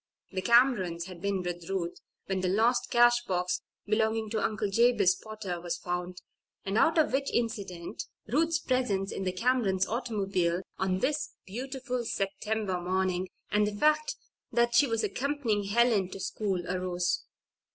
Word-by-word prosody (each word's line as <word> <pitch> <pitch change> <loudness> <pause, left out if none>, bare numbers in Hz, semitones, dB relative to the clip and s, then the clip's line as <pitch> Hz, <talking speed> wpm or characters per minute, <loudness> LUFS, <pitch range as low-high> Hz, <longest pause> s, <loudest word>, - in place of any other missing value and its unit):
The 190 -1 -2
Camerons 210 -8 +3
had 180 -2 -10
been 200 -2 -1
with 175 -1 -5
Ruth 175 -3 -2 0.3
when 190 -1 -1
the 185 - 0
lost 225 +6 +2
cash 240 0 +5
box 180 -2 -1 0.2
belonging 220 0 +1
to 220 -2 0
Uncle 210 -2 -1
Jabez 230 -3 +4
Potter 210 -5 -6
was 175 -1 -3
found, 180 0 -4 0.4
and 195 +1 -2
out 325 +8 +4
of 315 - +3
which 275 +1 +1
incident 200 -7 -3 0.2
Ruth's 320 +7 +2
presence 250 - 0
in 190 - -4
the 185 - +1
Camerons' 195 -2 +1
automobile 195 -7 -1 0.2
on 185 0 0
this 300 +1 0 0.2
beautiful 250 +3 -4
September 195 -2 -2
morning, 185 0 0 0.2
and 210 0 +3
the 210 - -3
fact 305 - +2 0.4
that 235 +1 +2
she 280 +4 +6
was 225 -2 0
accompanying 255 -7 -1
Helen 215 -2 +3
to 195 - -8
school, 190 -3 -2
arose. 180 -1 -1
205 Hz, 150 wpm, -29 LUFS, 185-240 Hz, 0.4 s, she